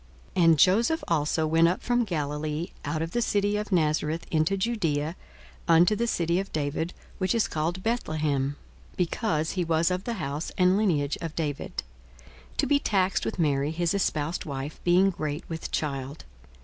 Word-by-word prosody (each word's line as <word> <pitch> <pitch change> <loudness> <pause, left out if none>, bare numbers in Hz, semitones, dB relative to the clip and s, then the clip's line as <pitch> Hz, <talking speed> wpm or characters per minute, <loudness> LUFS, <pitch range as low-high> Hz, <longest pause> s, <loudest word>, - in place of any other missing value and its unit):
42:002:004 180 - +3
And 165 -1 +6
Joseph 230 - +4
also 155 0 +1
went 165 +2 +4
up 180 +3 -1
from 245 -1 +2
Galilee, 150 -2 -2
out 155 +3 -2
of 165 - -5
the 240 - 0
city 205 -2 +1
of 210 0 -3
Nazareth, 155 -1 +1
into 160 +5 +2
Judaea, 170 -8 -1 0.5
unto 170 +4 +5
the 235 +3 0
city 170 -4 +1
of 195 - -5
David, 155 +3 -2 0.2
which 190 +4 +1
is 230 - +2
called 170 +4 -2
Bethlehem; 155 - 0 0.4
(because 165 -3 0
he 185 - -1
was 165 +1 +2
of 180 +1 -2
the 235 - -1
house 150 -5 -4
and 185 0 +4
lineage 160 -9 +1
of 165 -2 -5
David:) 150 -4 -3 0.7
42:002:005 - - -24
To - - +2
be 285 -1 +3
taxed 195 -7 +1
with - - -3
Mary 145 -4 +1
his 170 +2 0
espoused 165 -4 -1
wife, 140 -1 -5
being 185 +3 +4
great 155 -2 -4
with 165 -1 -5
child. 140 -1 -3
165 Hz, 175 wpm, -27 LUFS, 150-190 Hz, 0.7 s, And